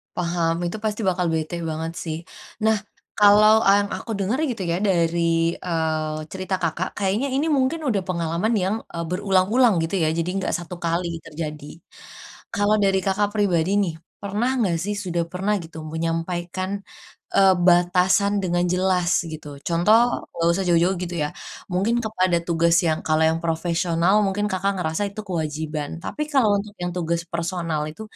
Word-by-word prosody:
Paham 170 Hz, -1 st, 0 dB
itu 175 Hz, +5 st, -3 dB
pasti 215 Hz, 0 st, -1 dB
bakal 180 Hz, -1 st, 0 dB
bete 160 Hz, +1 st, -2 dB
banget 160 Hz, +1 st, -3 dB
sih 160 Hz, -2 st, -3 dB, 0.5 s
nah 220 Hz, 0 st, +4 dB, 0.4 s
kalau 215 Hz, +2 st, +6 dB
yang 200 Hz, +1 st, +4 dB
aku 230 Hz, -, -7 dB
denger 200 Hz, +6 st, 0 dB
gitu 230 Hz, -, -6 dB
ya 170 Hz, -, +1 dB
dari, 170 Hz, -3 st, +1 dB
eee, 160 Hz, -3 st, -2 dB
cerita 190 Hz, 0 st, -2 dB
Kakak, 165 Hz, +2 st, -2 dB
kayaknya 205 Hz, +7 st, 0 dB
ini 285 Hz, +4 st, +1 dB
mungkin 285 Hz, +2 st, +1 dB
udah 205 Hz, -5 st, +1 dB
pengalaman 170 Hz, +4 st, -1 dB
yang, 195 Hz, -1 st, +1 dB, 0.2 s
eee, 170 Hz, -, -3 dB
berulang-ulang 195 Hz, +6 st, +3 dB
gitu 165 Hz, +4 st, -2 dB
ya 165 Hz, -3 st, +2 dB
jadi 165 Hz, +1 st, -1 dB
nggak 195 Hz, -, -2 dB
1 175 Hz, 0 st, -4 dB
kali 170 Hz, 0 st, -2 dB
terjadi, 150 Hz, -1 st, -6 dB, 0.9 s
kalau 205 Hz, +1 st, +3 dB
dari 195 Hz, -1 st, +3 dB
Kakak, 200 Hz, +1 st, +2 dB
pribadi 185 Hz, -4 st, +2 dB
nih 170 Hz, -5 st, -2 dB, 0.3 s
pernah 205 Hz, +5 st, -1 dB
nggak 190 Hz, -8 st, +1 dB
sih 205 Hz, +1 st, -2 dB
sudah 180 Hz, -4 st, -2 dB
pernah 195 Hz, +3 st, 0 dB
gitu 160 Hz, 0 st, -11 dB
menyampaikan, 170 Hz, +3 st, -3 dB, 0.7 s
eee, 195 Hz, -1 st, +6 dB
batasan 185 Hz, +3 st, +3 dB
dengan 175 Hz, -1 st, +1 dB
jelas 180 Hz, -1 st, +1 dB, 0.2 s
gitu 155 Hz, -1 st, -8 dB, 0.2 s
contoh 175 Hz, +6 st, +4 dB, 0.4 s
nggak 170 Hz, 0 st, +1 dB
usah 190 Hz, +2 st, -1 dB
jauh-jauh 175 Hz, +2 st, +3 dB
gitu 175 Hz, 0 st, -4 dB
ya 150 Hz, -, 0 dB, 0.4 s
mungkin 200 Hz, +6 st, +1 dB
kepada 185 Hz, -5 st, +1 dB
tugas 170 Hz, 0 st, +3 dB
yang 160 Hz, -1 st, +1 dB
kalau 155 Hz, 0 st, +3 dB
yang 165 Hz, +1 st, 0 dB
profesional 170 Hz, +2 st, +1 dB
mungkin 200 Hz, +2 st, -1 dB
Kakak, 190 Hz, +2 st, 0 dB
ngerasa 160 Hz, +2 st, -1 dB
itu 200 Hz, -, -7 dB
kewajiban 155 Hz, -3 st, -3 dB
tapi 300 Hz, -, -3 dB
kalau 225 Hz, -7 st, +4 dB
untuk 205 Hz, +1 st, -6 dB
yang 175 Hz, 0 st, -2 dB
tugas 170 Hz, -1 st, -1 dB
personal 170 Hz, -2 st, -2 dB
itu, 160 Hz, -, -10 dB
180 Hz, 160 wpm, -23 LUFS, 165-200 Hz, 0.9 s, kalau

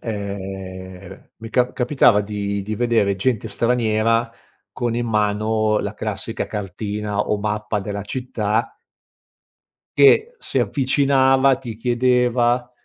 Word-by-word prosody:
ehm, 95 Hz, -3 st, -7 dB
mi 115 Hz, 0 st, -10 dB
cap 125 Hz, +1 st, +1 dB
capitava 125 Hz, -4 st, +3 dB
di 100 Hz, -1 st, -3 dB
di 105 Hz, +1 st, -4 dB
vedere 115 Hz, -5 st, +1 dB
gente 115 Hz, +1 st, -1 dB
straniera 115 Hz, 0 st, +1 dB, 0.4 s
con 120 Hz, -1 st, -2 dB
in 120 Hz, 0 st, -1 dB
mano 110 Hz, 0 st, +1 dB
la 100 Hz, +1 st, -4 dB
classica 110 Hz, +1 st, -4 dB
cartina 105 Hz, +1 st, -4 dB
o 105 Hz, -, +1 dB
mappa 105 Hz, 0 st, -2 dB
della 100 Hz, 0 st, -4 dB
città 110 Hz, -2 st, -2 dB, 1.2 s
che 440 Hz, -, +5 dB
si -, -, -1 dB
avvicinava, 135 Hz, -1 st, +3 dB
ti 120 Hz, -5 st, -8 dB
chiedeva, 125 Hz, 0 st, +1 dB
110 Hz, 110 wpm, -21 LUFS, 105-125 Hz, 1.2 s, che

